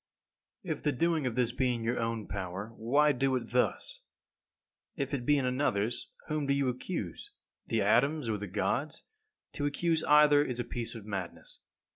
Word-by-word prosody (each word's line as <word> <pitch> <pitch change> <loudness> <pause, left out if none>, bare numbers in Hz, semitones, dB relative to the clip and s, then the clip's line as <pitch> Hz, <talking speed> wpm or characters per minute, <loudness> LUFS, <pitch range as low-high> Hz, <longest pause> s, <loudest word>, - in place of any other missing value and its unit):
17. 180 - -4
If - - -18
the 150 - +2
doing 165 0 +1
of 120 - -3
this 125 -2 +2
be 125 0 +1
in 115 - -5
your 120 +2 0
own 115 -2 -2
power, 95 +3 -5
why 145 +7 +3
do 135 0 +1
it 125 -2 -4
thus? 315 - 0 0.9
If 140 -3 -3
it 125 -3 -2
be 145 - +5
in 135 - 0
another's, 120 -4 0 0.2
whom 150 -2 -2
do 140 - +3
you 140 -2 +1
accuse? 125 - -5 0.4
The - - +1
atoms 140 +1 +3
or 105 -2 -1
the 105 - -5
Gods? 120 +9 -1 0.5
To 145 -2 -1
accuse 160 +2 0
either 150 -1 +6
is 125 -4 -3
a - - 0
piece 120 -1 -5
of 110 -3 -8
madness. 95 -4 -6
125 Hz, 185 wpm, -31 LUFS, 115-145 Hz, 0.9 s, either